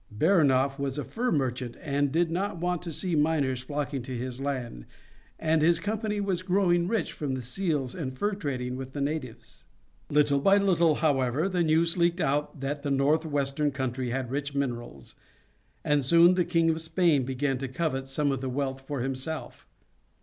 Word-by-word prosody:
Baranof 140 - +3
was 140 0 -2
a 145 - -2
fur 250 +2 -2
merchant, 125 -4 -1
and 145 -2 0
did 165 +2 +1
not 195 +3 -2
want 175 0 -1
to 175 -1 -6
see 180 +3 -2
miners 150 -4 +1
flocking 145 0 -3
to 125 0 -5
his 125 +1 -5
land, 125 - -4 0.5
as 160 -1 +2
his 170 +2 +4
company 210 0 -2
was 195 -3 -1
growing 180 -2 +2
rich 215 -4 -1
from 140 -3 -3
the 130 - -4
seals 145 -2 -2
and 130 -7 -5
fur 205 +9 0
trading 130 -9 -3
with 130 0 -7
the 145 - -4
natives. 140 - -5 0.5
Little 145 -1 +3
by 195 +8 +5
little, 170 -6 +3
however, 145 +1 +1
the 180 -2 0
news 165 +1 +3
leaked 170 +1 +2
out 150 -1 -1
that 140 +1 -3
the 145 - -3
northwestern 145 0 +1
country 130 -2 -3
had 130 0 -3
rich 140 0 -3
minerals, 120 - -4 0.7
and 150 -1 +2
soon 170 +6 +6
the 180 -1 +1
King 165 -2 +2
of 160 0 -2
Spain 160 -3 +2
began 135 +1 -1
to 135 - -3
covet 135 -1 -2
some 140 +1 0
of 135 -2 -2
that 130 - -3
wealth 135 0 -2
for 135 -1 -4
himself. 135 +5 -5
145 Hz, 180 wpm, -27 LUFS, 130-170 Hz, 0.7 s, soon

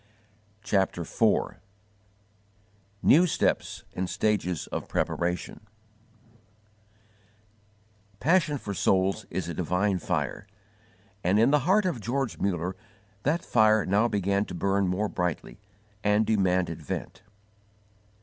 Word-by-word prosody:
CHAPTER 95 -3 0
IV - - +1 1.5
NEW 175 +5 +6
STEPS - - -1
AND 90 0 -3
STAGES 95 -6 0
OF - - -5
PREPARATION 90 +4 -2 2.5
PASSION 160 -1 +2
for 105 -6 -5
souls 95 +3 +1
is 90 0 -3
a 85 - -4
divine 90 +3 0
fire, - - -3 0.8
and 90 +4 +3
in 115 +5 +4
the 150 - +4
heart 205 +1 +4
of 170 -11 -1
George 125 +2 -2
Muller 90 -1 -1 0.5
that 155 +8 0
fire 110 -2 +4
now 105 +5 +3
began 100 -2 0
to - - -8
burn 100 +2 +1
more 95 +4 0
brightly, 90 -3 -3 0.4
and 105 +1 +3
demanded 90 -6 +1
vent. 75 - -6
100 Hz, 110 wpm, -27 LUFS, 90-110 Hz, 2.5 s, NEW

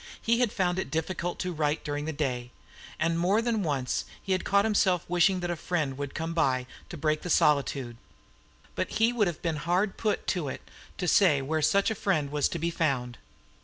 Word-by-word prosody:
He 235 +1 +1
had 245 -4 +2
found 180 -1 0
it - - -3
difficult 175 +2 -2
to 180 -1 -2
write 150 -1 0
during 145 -1 -3
the 160 - -2
day; 125 -5 -2 0.5
and 165 +1 0
more 190 +5 +3
than 230 -2 0
once 140 -7 -1 0.2
he 195 - -6
had 185 - +1
caught 200 +1 +3
himself 190 -5 +2
wishing 180 +1 +3
that 175 0 -2
a - - -1
friend 155 -5 -2
would 140 0 -5
come 165 +1 -3
in 130 -5 +2 0.2
to 170 - -7
break 155 0 0
the 180 - -6
solitude. 140 -6 +2 0.8
But - - -3
he 225 +2 +3
would 215 -5 +2
have 170 -3 -5
been 165 -3 -1
hard 180 +6 0
put 215 -2 -1
to 175 -6 -1
it - - -8 0.3
to 180 - -2
say 175 -6 +5
where 155 +4 -1
such 200 +8 +3
a - - +1
friend 165 -9 0
was 145 -1 +1
to - - -3
be 170 +1 -1
found. 130 -7 -1
165 Hz, 210 wpm, -28 LUFS, 145-185 Hz, 0.8 s, say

